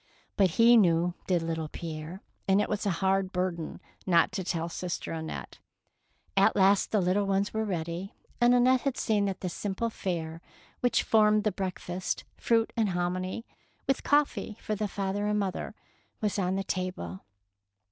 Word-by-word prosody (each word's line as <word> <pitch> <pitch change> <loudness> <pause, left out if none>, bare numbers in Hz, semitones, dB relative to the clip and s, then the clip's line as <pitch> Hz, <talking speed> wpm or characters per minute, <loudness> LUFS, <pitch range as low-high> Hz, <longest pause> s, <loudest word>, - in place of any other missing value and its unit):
But 195 -2 +4
he 235 +1 +7
knew, 175 -3 +3
did 175 -3 +2
little 160 -1 -2
Pierre, 160 +3 -7 0.2
and 195 +1 +4
it - - +1
was 210 -1 -1
a 180 -2 -1
hard 190 0 +2
burden 180 -3 -2 0.3
not 170 -2 +4
to 190 - -3
tell 170 -2 -2
sister 175 +1 -4
Annette. 160 -1 -6 0.8
At - - +4
last 195 0 +4
the 215 - +2
little 195 +2 +1
ones 195 +1 +1
were 220 0 0
ready, 175 +1 -4 0.3
and 240 +1 +6
Annette 250 +1 +4
had 275 -2 -1
seen 210 -3 +1
that 195 -2 -3
the 185 - -2
simple 205 +5 -2
fare 165 -5 -4 0.4
which 245 -2 +2
formed 215 -1 +4
the 215 - +2
break 190 -1 -3
fast 180 +1 -3
— - - -39
fruit 230 -1 +1
and 220 -3 +2
hominy, 185 +4 -2 0.4
with 270 - +1
coffee 290 -7 +1
for 215 - -3
the 210 0 -1
father 200 +1 -2
and 210 0 +1
mother 195 -3 -3 0.2
— - - -40
was 210 -2 -1
on 185 0 0
the 195 - -1
table. 180 - -4
190 Hz, 175 wpm, -29 LUFS, 175-210 Hz, 0.8 s, he